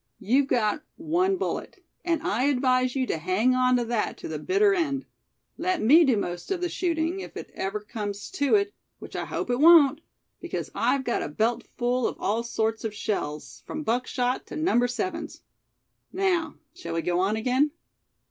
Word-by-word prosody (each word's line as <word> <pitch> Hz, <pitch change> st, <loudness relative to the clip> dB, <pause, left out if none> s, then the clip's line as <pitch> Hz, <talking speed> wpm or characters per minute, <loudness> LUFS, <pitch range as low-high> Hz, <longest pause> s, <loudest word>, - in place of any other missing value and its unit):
You've 265 Hz, +6 st, +2 dB
got 235 Hz, +1 st, +1 dB
one 355 Hz, +5 st, +1 dB
bullet, 385 Hz, -, -4 dB, 0.3 s
and 335 Hz, -2 st, 0 dB
I 240 Hz, +6 st, +1 dB
advise 255 Hz, -2 st, +2 dB
you 260 Hz, -1 st, +1 dB
to 165 Hz, -, -2 dB
hang 185 Hz, +9 st, +2 dB
on 255 Hz, 0 st, +3 dB
to 240 Hz, -, -1 dB
that 230 Hz, -2 st, -1 dB
to -, -, -7 dB
the 155 Hz, -1 st, -4 dB
bitter 400 Hz, -, +3 dB
end. 290 Hz, -7 st, -1 dB, 0.5 s
Let 365 Hz, +1 st, 0 dB
me 300 Hz, +10 st, +6 dB
do 255 Hz, -5 st, +3 dB
most 175 Hz, -3 st, -4 dB
of 385 Hz, -2 st, -1 dB
the 355 Hz, 0 st, -1 dB
shooting, 335 Hz, +1 st, -1 dB
if -, -, -8 dB
it -, -, -8 dB
ever 195 Hz, +2 st, -3 dB
comes 205 Hz, -1 st, -6 dB
to 285 Hz, -2 st, +2 dB
it, 400 Hz, 0 st, +1 dB, 0.2 s
which -, -, -11 dB
I -, -, -2 dB
hope -, -, -3 dB
it 245 Hz, -, 0 dB
won't; 305 Hz, -2 st, +7 dB, 0.4 s
because -, -, -5 dB
I've 275 Hz, -1 st, +1 dB
got 240 Hz, -, -1 dB
a -, -, -3 dB
belt 225 Hz, +9 st, 0 dB, 0.2 s
full 245 Hz, 0 st, +1 dB
of -, -, -5 dB
all 220 Hz, +3 st, 0 dB
sorts 225 Hz, -1 st, -2 dB
of 220 Hz, -2 st, -4 dB
shells, 150 Hz, -9 st, -4 dB
from 310 Hz, 0 st, -4 dB
buckshot 250 Hz, +1 st, -1 dB
to -, -, -8 dB
Number 310 Hz, -7 st, +2 dB
Sevens. 250 Hz, +10 st, -4 dB, 0.7 s
Now, 360 Hz, -5 st, 0 dB, 0.2 s
shall 365 Hz, -, -6 dB
we 165 Hz, -, -1 dB
go 175 Hz, 0 st, 0 dB
on 195 Hz, +3 st, +1 dB
again?" 255 Hz, +6 st, +2 dB
255 Hz, 185 wpm, -26 LUFS, 220-325 Hz, 0.7 s, won't